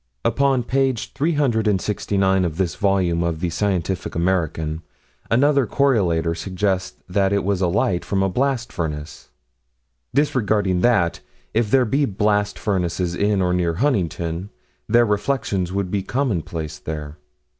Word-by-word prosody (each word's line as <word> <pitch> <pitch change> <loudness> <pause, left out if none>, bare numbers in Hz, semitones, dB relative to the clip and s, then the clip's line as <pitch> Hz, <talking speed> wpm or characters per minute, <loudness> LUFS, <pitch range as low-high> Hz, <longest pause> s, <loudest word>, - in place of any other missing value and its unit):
Upon 135 -2 +2
page 130 -2 0
369 105 - +1
of 80 -3 -2
this 95 -3 0
volume 95 -4 +1
of 85 -2 -1
the 85 0 -2
Scientific 95 -1 -1
American, 80 -3 -1 0.5
another 140 +1 +3
correlator 90 -12 +2
suggests 95 +1 -2
that 95 +1 +1
it 100 0 +1
was 100 -1 0
a 90 - +3
light 90 0 +1
from 95 -1 0
a - - +2
blast 125 +3 -1
furnace 75 -3 -5 0.8
disregarding 105 -9 +1
that, 100 -7 +2 0.3
if 110 -1 +1
there 130 +2 +4
be 140 +6 +1
blast 105 -1 0
furnaces 90 -3 -1
in 100 +1 +1
or 90 0 +1
near 85 -2 0
Huntington, 90 - -1 0.4
their 120 +2 +5
reflections 105 -4 -1
would 95 -1 -2
be 100 - 0
commonplaces 85 - -2
there. 75 -1 -6
95 Hz, 135 wpm, -21 LUFS, 85-115 Hz, 0.8 s, their